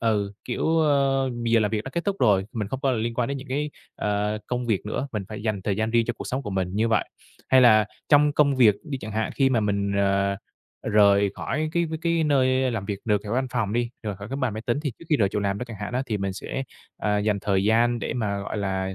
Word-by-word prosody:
ừ, 105 -3 0
kiểu, 160 +6 0
ơ, 135 -3 +2
giờ 115 -1 +3
làm 105 -1 +1
việc 110 -1 -2
đã 135 - -6
kết 170 +4 -3
thúc 200 -1 -1
rồi, 100 -4 +3
mình 105 -4 -3
không 135 +4 -4
có 135 - +1
liên 115 0 -1
quan 120 0 0
đến 140 - -2
những 135 - -10
cái, 145 +3 -2 0.3
ờ, 105 +1 -1
công 125 -1 -2
việc 105 -2 0
nữa, 135 +6 -3
mình 105 -3 -2
phải 105 -1 -7
dành 105 -3 -2
thời 100 0 -1
gian 110 +1 0
riêng 115 0 +3
cho - - 0
cuộc - - -7
sống 130 +2 -2
của 105 - -5
mình 95 -1 -1
như 115 +2 +2
vậy. 115 - +2 0.4
Hay 130 -1 +6
là 110 -3 +6 0.2
trong 150 0 +5
công 145 -2 +3
việc 110 -6 +6
đi 145 -4 -4
chẳng 110 -4 -7
hạn 110 +1 -1
khi 135 -1 +3
mà 120 -3 +2
mình, 100 -1 0
ờ, 100 0 +2 0.5
rời 100 -2 +4
khỏi 155 +5 -2
cái 170 -1 +1 0.2
cái 170 -1 +1
nơi 130 -2 +2
làm 110 -4 -3
việc 100 -1 -3
được 105 -2 +1
ở 105 - -5
văn 130 +2 +1
phòng 110 -4 -1
đi, 120 0 0
rời 105 -3 -4
khỏi 100 +2 -9
cái 135 - -4
bàn 130 -6 -1
máy 110 - -5
tính 120 +3 +1
thì 145 -5 -2
trước - - -13
khi 150 - +4
rời 100 -4 +2
chỗ 105 - -2
làm 100 0 -1
đó 125 - -3
chẳng 115 -3 -9
hạn 105 - -4
á, 125 +2 0
thì 110 -4 -2
mình 100 -1 -2
sẽ, 120 +7 -4 0.4
à, 105 -1 +1
dành 105 -1 +1
thời 100 -1 +1
gian 120 +2 +3
để - - -3
mà, 105 -4 -1
gọi 100 - -5
là, 95 -1 -2
110 Hz, 270 wpm, -25 LUFS, 100-130 Hz, 0.5 s, Hay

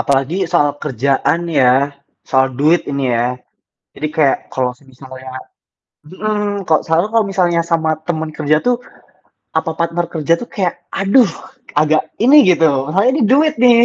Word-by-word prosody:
Apalagi 140 +4 0
soal 145 - +3
kerjaan 140 +4 0 0.2
ya, 125 -1 +5 0.6
soal 130 0 +3
duit 155 +5 +3
ini 140 -1 -3
ya. 120 +1 +1 0.7
Jadi 155 - -3
kayak, 145 -4 +3 0.2
kalo 130 -1 0
semisalnya 130 -1 -12 0.8
mhm, 205 +3 -3
kok 155 - +3
selalu 165 +3 +1
kalau 225 -2 +3
misalnya, 175 -3 +1
sama 160 -1 +1 0.2
teman 160 -2 -2
kerja 155 0 +1
tuh, 245 -1 +2 0.8
apa 160 - -3
partner 170 +1 -1
kerja 160 0 0
tuh 240 - -8
kayak, 185 -4 -1 0.3
aduh, 200 +4 +4 0.5
agak 155 0 +2 0.2
ini 280 +4 +6
gitu, 165 -2 +4 0.2
masalahnya 200 +10 +2
nih 225 - +3
duit 300 +2 +3
nih. 235 -1 +6
165 Hz, 145 wpm, -16 LUFS, 140-200 Hz, 0.8 s, ini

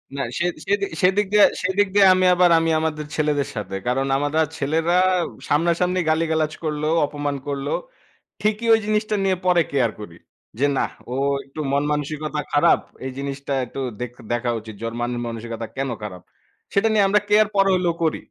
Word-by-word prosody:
না। 140 - -2 0.2
সে, 175 - +1 0.2
সেদিক, 200 0 0
সেদিক 190 +3 +3
দিয়ে, 210 - +8 0.2
সেদিক 190 +2 +1
দিয়ে 200 -1 +7
আমি 185 0 +2
আবার 180 0 +5
আমি 165 0 0
আমাদের 155 -1 -2
ছেলেদের 150 -3 0
সাথে। 95 -2 -5
কারণ 135 +2 +1
আমারা 145 +2 0 0.2
ছেলেরা 160 +4 0 0.5
সামনা-সামনি 170 +4 +1
গালিগালাজ 160 -1 +1
করলেও, 155 +1 0
অপমান 145 -1 -3
করলেও 140 0 -2 0.7
ঠিকই 215 +2 0
ওই - - +4
জিনিসটা 215 0 0
নিয়ে 190 -1 +2
পরে 175 -2 +4
কেয়ার 125 -5 +2
করি। 85 -5 -9 0.4
যে 140 - +3
না, - - +2 0.3
ও - - -2 0.3
একটু 140 +3 -9
মন-মানসিকতা 150 +1 -1
খারাপ। 145 - +4 0.2
এই 130 - -3
জিনিসটা 140 0 -4
একটু 135 +3 -7 0.2
দেক 125 -1 -4 0.2
দেখা 120 0 0
উচিত। 110 -1 -10
যে - - -6
ওর 115 - -7
মান 120 +1 -1 0.2
মানসিকতা 115 0 -5
কেন 135 0 -2
খারাপ। 90 -4 -7 0.5
সেটা 210 +3 +3
নিয়ে 205 -2 +4
আমরা 210 +1 +4
কেয়ার 210 0 +5
পরে 195 0 +4
হইলেও 175 -2 +1
করি। 160 - +1
155 Hz, 175 wpm, -22 LUFS, 135-185 Hz, 0.7 s, দিয়ে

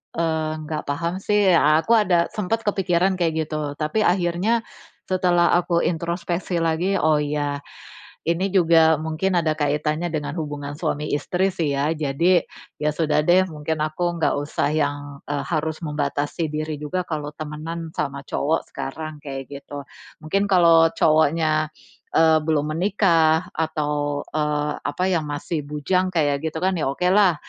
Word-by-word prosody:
eee, 160 -2 0
nggak 155 0 -4
paham 170 +5 -2
sih." 205 -4 +4
A 155 0 +5
aku 230 +5 +3
ada 175 -6 +3
sempet 215 +2 -1
kepikiran 190 -1 +2
kayak 160 -2 0
gitu. 150 -2 -3
Tapi 155 +8 0
akhirnya 180 +5 +2 0.5
setelah 180 -2 +2
aku 175 -1 +2
introspeksi 170 +1 -2
lagi. 165 +4 +1
"Oh 155 -1 +3
iya. 145 -1 -2 0.6
Ini 170 +4 0
juga 165 -3 +5
mungkin 160 +4 -1
ada 160 -2 +1
kaitannya 150 +3 0
dengan 150 -2 -3
hubungan 145 -2 -5
suami 150 -2 -2
istri 180 +6 0
sih 155 -6 -1
ya. 140 +3 +1
Jadi 160 +4 +2 0.4
ya 150 0 +1
sudah 155 -2 +2
deh, 185 +2 +6
mungkin 155 +1 -3
aku 155 +3 -1
enggak 155 - +2
usah 145 0 -1
yang, 145 -2 0 0.3
eee, 145 -1 -2
harus 160 -1 -2
membatasi 150 +1 -2
diri 155 -1 -3
juga 180 +5 -2
kalau 150 -2 -4
temanan 160 +2 -6
sama 140 -1 -3
cowok 155 +4 0
sekarang," 150 +2 -6
kayak 135 -2 -5
gitu. 140 0 -8 0.4
Mungkin 195 +6 0
kalau 165 -3 +6
cowoknya, 155 0 +2 0.5
eee, 160 -1 +5
belum 155 -1 0
menikah 165 -3 +2
atau, 150 -2 -1
eee, 150 -1 0
apa, 145 +5 -3
yang 160 -4 0
masih 145 +2 -3
bujang 150 +6 0
kayak 145 -5 +1
gitu 160 - -7
kan, 190 - +3
ya 135 - 0
okelah 180 +4 +3
160 Hz, 150 wpm, -23 LUFS, 150-175 Hz, 0.6 s, deh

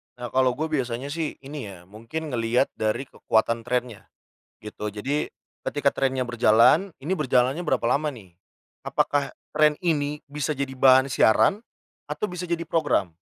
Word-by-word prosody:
Nah, 120 -1 -7
kalau 130 -1 +2
gua 160 +3 -3
biasanya 130 -1 -2
sih, 160 0 -3
ini 140 -4 -7
ya 95 -3 -11
mungkin 115 - -7
ngelihat 120 +2 +1
dari 110 +4 0
kekuatan 115 +1 0
trennya 125 -3 -2 0.6
gitu. 105 0 -5
Jadi 130 +9 -2 0.4
ketika 145 -1 +1
trennya 130 -1 0
berjalan, 120 - +4
ini 160 +7 -2
berjalannya 130 -3 +2
berapa 130 -9 0
lama 140 +6 +2
nih. 110 -11 -9 0.5
Apakah 145 -1 0 0.2
tren 150 -1 +4
ini 150 -3 0
bisa 145 0 -2
jadi 135 -1 -3
bahan 130 +1 +6
siaran 195 - +4 0.5
atau - - -4
bisa 180 0 -5
jadi 170 -1 -1
program. 145 - +1
130 Hz, 150 wpm, -25 LUFS, 115-150 Hz, 0.6 s, bahan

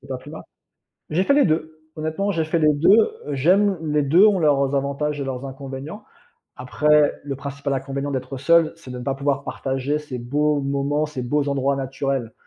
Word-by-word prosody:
C'est - - -17
pas - - -3
plus - - -13
ma - - -9 0.7
J'ai 180 +5 +1
fait 280 - +3
les 285 -5 +4
2, 155 0 -2 0.2
honnêtement, 160 +6 -2
j'ai 165 -5 0
fait 160 +2 0
les 155 -1 +4
2, 145 +6 +3 0.4
heu, 145 - -3
j'aime, 190 +7 +3
les 150 -1 +1
2 170 +9 +5
ont 205 -3 +3
leurs 140 -4 +2
avantages 140 +1 -2
et - - -2
leurs 135 0 -5
inconvénients. 135 +8 -8 0.5
Après, 145 +5 +2
le 140 -1 -4
principal 140 +1 -5
inconvénient 135 +1 -3
d'être 130 0 -4
seul, 165 +4 +3
c'est 135 -6 -13
de 125 - -6
ne - - -7
pas 135 - -1
pouvoir 140 0 -1
partager 135 +3 -2
ces 145 -4 -7
beaux 145 +4 0
moments, 140 +2 -1
ces 145 -4 -6
beaux 145 +4 0
endroits 140 0 0
naturels. 135 -3 -3
140 Hz, 200 wpm, -22 LUFS, 135-155 Hz, 0.7 s, 2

